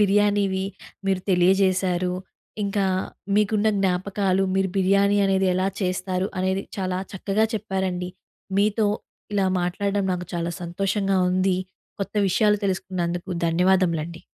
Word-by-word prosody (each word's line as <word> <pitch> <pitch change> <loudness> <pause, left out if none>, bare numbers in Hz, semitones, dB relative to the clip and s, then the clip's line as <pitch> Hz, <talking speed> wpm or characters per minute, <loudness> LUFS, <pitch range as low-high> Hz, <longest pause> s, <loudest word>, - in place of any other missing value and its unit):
బిర్యానీవి 200 -1 +2 0.4
మీరు 190 -1 +1
తెలియజేశారు. 185 0 +2 0.5
ఇంకా 200 -1 0 0.5
మీకున్న 210 +1 +3
జ్ఞాపకాలు, 190 +1 +1
మీరు 190 0 +2
బిర్యానీ 200 +1 +3
అనేది 190 0 +2
ఎలా 185 +1 +1
చేస్తారు, 185 +1 -1
అనేది 190 +1 0 0.2
చాలా 185 -1 -1 0.2
చక్కగా 200 +3 +1
చెప్పారండి. 190 -3 -2 0.5
మీతో 210 +1 +2 0.5
ఇలా 195 -2 +2
మాట్లాడడం 200 +3 -1
నాకు 180 0 -3
చాలా 170 0 -2
సంతోషంగా 195 +2 0
ఉంది. 185 0 +2 0.4
కొత్త 195 - -4
విషయాలు 210 +2 +3
తెలుసుకున్నందుకు. 185 -2 -2 0.2
ధన్యవాదములండి. 170 -1 +1
190 Hz, 110 wpm, -24 LUFS, 180-200 Hz, 0.5 s, మీకున్న